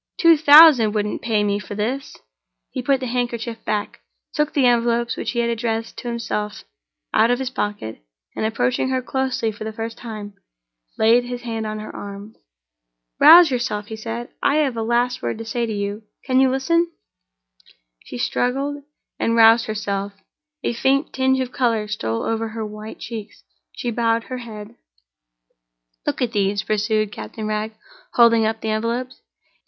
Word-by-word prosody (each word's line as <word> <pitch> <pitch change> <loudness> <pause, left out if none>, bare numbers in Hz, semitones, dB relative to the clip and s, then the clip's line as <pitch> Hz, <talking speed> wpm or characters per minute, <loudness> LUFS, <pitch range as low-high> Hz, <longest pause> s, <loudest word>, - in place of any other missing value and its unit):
"Two 335 -2 +6
thousand 290 -7 +8
wouldn't 210 0 -1
pay 220 -3 +1
me 205 0 0
for 205 +1 -8
this!" 245 +7 -3 0.5
He - - -3
put 265 +1 +1
the - - -2
handkerchief 235 -2 -3
back, 210 -1 -2 0.3
took 300 -1 0
the 275 -3 +3
envelopes 235 -1 +2
which - - -4
he 240 - -2
had 235 0 0
addressed 230 -1 -2
to - - -7
himself 230 -3 -3 0.5
out 230 - +4
of 245 - +2
his 260 -1 -3
pocket, 205 - -4 0.3
and, - - -3
approaching 245 +4 0
her 260 -1 -1
closely 260 -4 -1
for 210 - -9
the 220 - -4
first 225 +1 -6
time, 215 -3 -7 0.6
laid 230 +3 +4
his 245 0 -6
hand 225 -2 -3
on 215 0 -4
her 215 - -8
arm. 200 +2 -8 0.8
"Rouse 340 -3 +9
yourself," 225 -5 -2
he 220 - -5
said, 230 +2 -6
"I 280 - +2
have 290 -5 +1
a 225 - -2
last 240 +2 0
word - - -3
to 225 - -7
say 235 +1 -2
to - - -4
you. 205 0 -3 0.2
Can 255 0 +2
you 265 0 +5
listen?" 335 +6 +1 1.1
She - - -7
struggled, 275 +4 -1 0.4
and 230 - +1
roused 225 0 +6
herself—a 215 +8 -5
faint 270 +4 +1
tinge 265 0 +2
of 255 -1 -4
color 230 -5 0
stole 115 - -3
over 225 0 -1
her 220 0 -5
white 215 +1 -8
cheeks—she - - -8
bowed 230 0 +1
her 255 +1 -6
head. 215 -3 -9 1.3
"Look - - 0
at 240 - -1
these," 200 -2 0
pursued 215 0 0
Captain 110 - -7
Wragge, 215 +1 -2 0.4
holding 230 -2 +5
up 220 0 -3
the 220 - -3
envelopes. 235 +4 -3
230 Hz, 165 wpm, -21 LUFS, 215-250 Hz, 1.3 s, Rouse